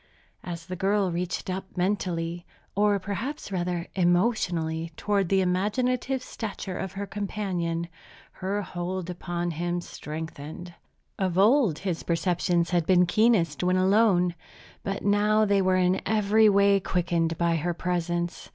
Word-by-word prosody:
As 170 -1 -6
the 185 - -5
girl 195 0 +1
reached 170 0 -3
up 190 0 -5
mentally, 175 -3 -1 0.3
or 205 0 +3
perhaps, 205 +7 -5
rather, 175 -2 -2
emotionally, 175 -3 +1
toward 200 -4 0
the 195 -1 +3
imaginative 250 +8 0
stature 200 -6 -5
of 190 -1 -4
her 200 +1 -4
companion, 185 -5 -3 0.4
her 200 +2 -3
hold 180 0 -4
upon 175 0 -3
him 175 +2 -2
strengthened. 160 +1 -7 0.5
Of 185 -2 0
old, 215 - +4
his 180 -4 -3
perceptions 175 0 0
had 175 -3 +1
been 180 -1 +5
keenest 180 -6 +2
when 180 +1 +2
alone, 185 -2 +3 0.5
but 195 0 -4
now 210 +1 +3
they 200 -1 +3
were 185 0 +2
in 185 0 +2
every 215 0 +4
way 200 0 +4
quickened 170 -3 0
by 170 -1 +2
her 170 +2 -2
presence. 175 -1 -2
185 Hz, 135 wpm, -26 LUFS, 175-200 Hz, 0.5 s, been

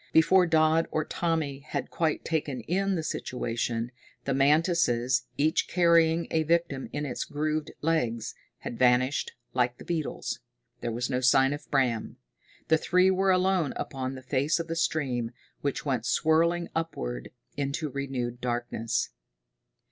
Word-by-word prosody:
Before 180 +3 +5
Dodd 160 0 +3
or 155 0 -1
Tommy 160 -6 -1
had 145 +2 -5
quite 160 -2 0
taken 145 -6 -1
in 195 - 0
the 165 - -2
situation, 120 -4 -2 0.3
the 135 - 0
mantises, 135 -4 +2
each 155 +2 +2
carrying 170 -1 +4
a 160 - +2
victim 160 -4 0
in 145 0 -3
its 125 - -3
grooved 155 +1 -2
legs, 120 -8 0 0.3
had 120 - -6
vanished 130 +2 +3 0.2
like 125 -1 +1
the - - -12
beetles. 160 -7 -3 0.4
There 120 - -3
was 120 +3 -2
no 125 - +1
sign 135 +2 +4
of 145 - -8
Bram. 125 -5 0 0.5
The 160 0 +4
three 180 +3 +4
were 190 +1 +2
alone 185 -4 +2
upon 130 -1 -4
the 130 - -9
face 140 +5 +1
of 165 - -3
the 165 - -3
stream, 130 -8 -1 0.3
which 140 +1 -2
went 125 -5 -1
swirling 165 +5 +2
upward 60 - -3 0.3
into 145 +3 -2
renewed 125 -3 -3
darkness. 120 -2 -1
145 Hz, 145 wpm, -28 LUFS, 125-165 Hz, 0.5 s, Before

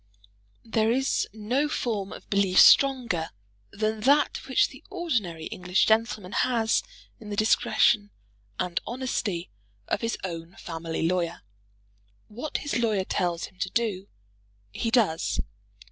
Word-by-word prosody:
There 225 -1 +1
is 265 +2 +1
no 240 +8 -1
form 215 -9 -2
of - - -10
belief 200 -2 +3
stronger 245 -12 +5 0.4
than 215 +2 -2
that 280 +6 +2
which - - +3
the - - -14
ordinary 225 - -2
English 180 +1 +1
gentleman 220 -3 +1
has 230 -2 +2 0.4
in 215 - -10
the 205 - -3
discretion 210 0 +3 0.5
and 175 -2 -1
honesty 230 -8 -3 0.4
of - - -1
his 230 0 -1
own 170 -1 -6
family 165 -1 -3
lawyer. 170 -1 -1 0.9
What 245 +8 -4
his 285 - 0
lawyer 215 -5 +1
tells 175 -3 -1
him 185 - -17
to 190 - -1
do, 200 -4 -1 0.6
he 230 - -2
does. 210 -9 +1
210 Hz, 130 wpm, -26 LUFS, 180-235 Hz, 0.9 s, stronger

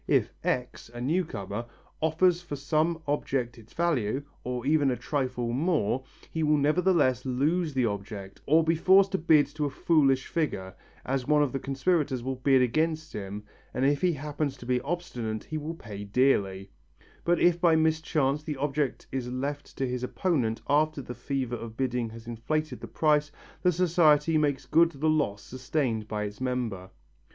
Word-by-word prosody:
If - - +2
X., 125 -2 -2
a 120 - -8
new 160 +9 +1
comer, 100 - -5 0.4
offers 170 +3 +3
for 175 -4 -6
some 155 +4 0
object 130 -4 -1
its 110 0 -17
value, 140 -7 0 0.2
or 125 0 -4
even 145 -1 +3
a 125 - +1
trifle 125 -4 -2
more, 135 - +1 0.3
he 160 - -2
will 150 -1 +3
nevertheless 150 -4 +2
lose 150 +5 0
the 130 -2 +2
object 100 -2 -5
or 160 +3 +5
be 165 +1 +2
forced 190 +4 +5
to 190 - 0
bid 155 -3 +5
to 150 -1 -1
a - - 0
foolish 135 -2 +2
figure, 100 - -2 0.3
as 130 -1 -1
one 150 0 +4
of 140 - -1
the 135 - -2
conspirators 135 -2 0
will 130 0 -3
bid 130 0 +4
against 155 +5 0
him 100 0 -6 0.3
and 130 +2 +1
if 145 +1 +2
he 180 -2 +3
happens 145 -1 -3
to 120 - -11
be 125 0 +1
obstinate 125 -9 -4
he 155 +1 -4
will 155 +3 -5
pay 105 -9 -8
dearly, 100 -4 +1 0.5
but 175 -1 +2
if 175 -1 +3
by 170 -3 +5
mischance 155 -3 +1
the 150 -2 -5
object 140 -1 -1
is 130 -2 -3
left 140 +3 -4
to 135 - 0
his 125 0 -3
opponent 125 -6 0
after 150 0 +2
the 125 - -6
fever 130 -2 -3
of 115 0 -8
bidding 125 -3 -1
has 115 +1 -11
inflated 155 +7 -3
the - - -6
price, 150 -1 +2 0.3
the 180 - +4
society 160 -3 +3
makes 145 -3 +1
good 165 +2 +4
the 145 +3 -1
loss 145 -10 +1
sustained 130 -4 -2
by 105 -1 -2
its 105 +3 -6
member. 120 -8 -2
140 Hz, 180 wpm, -28 LUFS, 125-155 Hz, 0.5 s, or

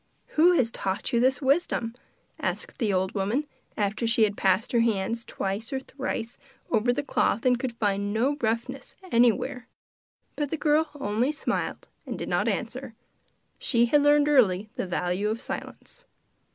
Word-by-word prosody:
'Who 340 +4 +5
has 245 -9 +2
taught 190 +2 -3
you 235 - +4
this 260 +3 +2
wisdom?' 265 -5 +1 0.5
asked - - -3
the 220 -5 +1
old 190 0 0
woman, 210 +9 0 0.3
after 215 +3 0
she 230 0 +4
had 205 -1 +2
passed 195 +4 +2
her 235 - +3
hands 230 0 0
twice 200 +3 -4
or 270 - -1
thrice 255 -3 -4 0.3
over 230 +1 +3
the 265 +4 -1
cloth 230 -3 0
and 250 -1 +4
could 255 -2 -3
find 200 -2 0
no 250 +7 +1
roughness 235 +4 -2 0.2
anywhere. 240 +1 +2 0.7
But 295 -2 -2
the 320 - -2
girl 305 +1 +2
only 230 +4 0
smiled 305 - -3 0.2
and - - -4
did - - -5
not - - +1
answer. 245 0 -3 0.6
She 235 -2 +3
had 290 +5 +4
learned 290 0 +5
early 215 -8 +3
the - - -3
value 180 +3 -1
of 220 +1 -2
silence. 485 - -8
235 Hz, 165 wpm, -27 LUFS, 210-270 Hz, 0.7 s, Who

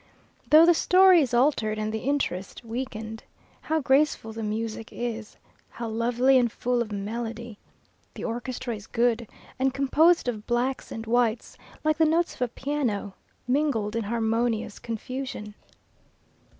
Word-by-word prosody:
Though 315 +2 +8
the 345 - +6
story 365 +1 +6
is 265 - -1
altered, 240 -4 +2
and 215 0 -2
the 220 - -1
interest 235 -7 -2
weakened, 225 -2 -5 0.4
how 320 0 0
graceful 270 -4 +2
the 225 - -6
music 220 +1 -4
is! 230 -3 -5 0.3
how 235 -1 -6
lovely 245 +4 +3
and 240 -2 +1
full 245 +1 0
of 220 -2 -4
melody! 225 +2 -5 0.6
The - - -7
orchestra 245 +1 -4
is 205 0 -11
good, 235 -1 +1 0.3
and 265 0 +1
composed 305 +4 +3
of 220 -3 -3
blacks 245 +2 -1
and 225 0 -6
whites, 235 0 0 0.3
like 310 0 +1
the 320 - +6
notes 330 +2 +1
of - - -16
a 250 - +2
piano, 240 -6 -2 0.3
mingled 250 -6 0
in 230 -2 -1
harmonious 225 0 -1
confusion. 230 -2 -5
240 Hz, 145 wpm, -26 LUFS, 220-265 Hz, 0.6 s, Though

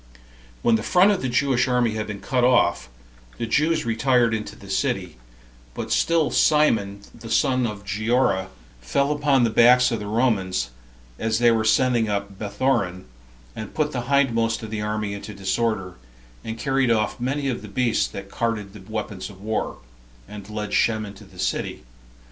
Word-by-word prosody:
When 115 -1 +4
the - - -5
front 180 - +4
of 200 - -1
the 130 - -1
Jewish 130 +1 +2
army 125 -2 +2
had 110 0 -3
been 105 -2 -6
cut 125 -2 0
off, 120 - +3 0.5
the - - -2
Jews 155 +7 +1
retired 120 0 +2
into 110 -1 -4
the - - -14
city; - - -2 0.6
but - - -5
still 165 -6 +2
Simon, 115 -12 +2
the 115 -1 -11
son 130 0 +2
of 100 -2 -7
Giora, 105 -1 +1 0.3
fell 140 - 0
upon 145 -3 +2
the 115 - +2
backs 125 +3 +5
of 115 - -1
the 105 - -6
Romans, 100 - 0 0.5
as 110 -1 0
they 120 0 +5
were 115 -1 +2
ascending 115 0 +2
up 100 -1 -3
Bethoron, 100 -4 -1 0.5
and 110 - -7
put 150 -1 0
the 125 - -2
hindmost 115 -5 +2
of 110 - -7
the 110 -1 -3
army 105 -1 -2
into 100 +1 -8
disorder, 95 -1 -1 0.5
and 110 0 -5
carried 135 +1 +1
off 110 0 +1
many 135 +3 -1
of 125 -3 -2
the 110 - -9
beasts 120 +2 +1
that 100 0 -9
carried 110 -4 -2
the 105 - -11
weapons 105 -3 -4
of 95 -2 -14
war, 110 +2 -3 0.5
and 105 -1 -10
led 105 -1 -4
Shem 110 -1 +2
into 100 -1 -11
the - - -18
city. - - -2
115 Hz, 175 wpm, -23 LUFS, 105-125 Hz, 0.6 s, backs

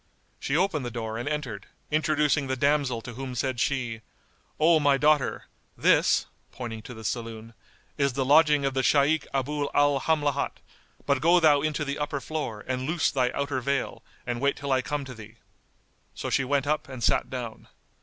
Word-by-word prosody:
She 140 - 0
opened 170 -6 +1
the 120 - -3
door 115 -1 -4
and 120 - -3
entered, 130 -10 -4 0.2
introducing 150 -2 +2
the 130 - -1
damsel 140 -3 +1
to 120 - -8
whom 130 +1 -6
said 130 0 -1
she, 125 -4 -1 0.6
"O 160 +1 +5
my 145 -2 +3
daughter, 150 -1 +2 0.3
this - - +3 0.3
(pointing 115 -3 -6
to 125 - -10
the 110 - -10
saloon) 115 +2 -5 0.5
is 140 -2 +2
the 135 +1 -1
lodging 150 0 +5
of 135 - 0
the 135 - +1
Shaykh 145 +3 +3
Abu 145 +2 -1
al 145 -1 +4
Hamlat; 150 -2 0 0.5
but 140 -2 +1
go 170 +3 +5
thou 150 -4 +5
into 150 0 -1
the 140 +1 -3
upper 145 -1 -2
floor 135 -8 -4
and 130 0 -3
loose 165 +1 +1
thy 130 -3 +1
outer 140 -2 -1
veil 140 +1 -2 0.2
and 120 0 -3
wait 140 0 +2
till 140 -1 -4
I 130 -1 +3
come 145 +1 -3
to 130 - -8
thee." 110 -1 -12 0.8
So - - -4
she 135 - +2
went 140 +1 0
up 150 -1 -1
and 130 -3 -7
sat - - +2
down. 120 -4 -6
140 Hz, 185 wpm, -27 LUFS, 125-150 Hz, 0.8 s, O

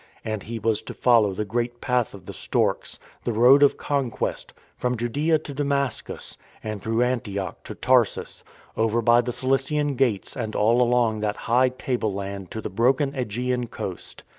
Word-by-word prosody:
And 110 -2 -2
he 115 +3 -6
was 115 -1 0
to - - -9
follow 115 -5 +4
the 105 - -2
great 120 +3 -2
Path 125 -4 0
of 95 -2 -13
the - - -7
Storks, - - -1 0.3
the - - -1
Road 125 +5 +6
of 145 - +5
Conquest, 140 -5 -2 0.2
from 125 0 -1
Judaea 145 +8 +1
to 150 -2 -8
Damascus, 140 -3 -2 0.2
and 110 -2 -4
through 115 +3 +1
Antioch 105 -7 -3
to - - -7
Tarsus, - - +1 0.3
over 115 +1 +1
by 120 +1 +5
the 125 +1 -3
Cilician 135 +3 0
Gates 120 -6 0
and 110 -3 -4
all 115 +4 +3
along 120 -3 +2
that 105 -1 -1
high 125 +2 +4
tableland 100 -7 -3
to 110 - -5
the - - -4
broken 130 +7 +2
^gean 125 -1 -2
coast. 95 -5 -7
120 Hz, 165 wpm, -24 LUFS, 110-130 Hz, 0.3 s, Road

